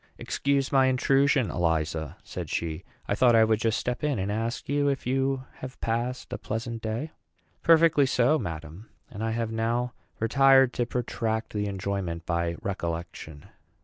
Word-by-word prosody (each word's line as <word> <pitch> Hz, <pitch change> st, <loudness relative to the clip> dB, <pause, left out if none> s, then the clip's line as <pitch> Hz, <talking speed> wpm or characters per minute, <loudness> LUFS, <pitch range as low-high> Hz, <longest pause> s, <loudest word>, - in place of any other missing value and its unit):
"Excuse 140 Hz, -1 st, 0 dB
my 135 Hz, -1 st, +5 dB
intrusion, 135 Hz, 0 st, +3 dB
Eliza," 80 Hz, -3 st, -1 dB
said -, -, -6 dB
she. 80 Hz, +1 st, -3 dB, 0.2 s
"I -, -, +1 dB
thought 120 Hz, +2 st, +4 dB
I 110 Hz, -, +7 dB
would 110 Hz, -1 st, +2 dB
just 110 Hz, -1 st, +1 dB
step 125 Hz, +2 st, -3 dB
in 150 Hz, -4 st, +1 dB
and 95 Hz, +1 st, -2 dB
ask 115 Hz, +3 st, -3 dB
you 145 Hz, +1 st, +1 dB
if 140 Hz, -2 st, -1 dB
you 135 Hz, +1 st, 0 dB
have 130 Hz, 0 st, -8 dB
passed 120 Hz, +3 st, -2 dB
a -, -, -4 dB
pleasant 115 Hz, +1 st, -4 dB
day." 115 Hz, +8 st, -3 dB, 0.5 s
"Perfectly 165 Hz, -4 st, +5 dB
so, 130 Hz, +5 st, +3 dB
madam; 80 Hz, -, -7 dB, 0.2 s
and 110 Hz, 0 st, -6 dB
I 115 Hz, -, 0 dB
have 115 Hz, 0 st, -2 dB
now 120 Hz, +2 st, -1 dB, 0.3 s
retired 135 Hz, +2 st, +5 dB
to 120 Hz, -1 st, -1 dB
protract 115 Hz, -2 st, -2 dB
the 105 Hz, -1 st, -1 dB
enjoyment 95 Hz, -4 st, -3 dB
by 85 Hz, 0 st, -1 dB
recollection." 85 Hz, -5 st, -5 dB
115 Hz, 160 wpm, -27 LUFS, 95-130 Hz, 0.5 s, I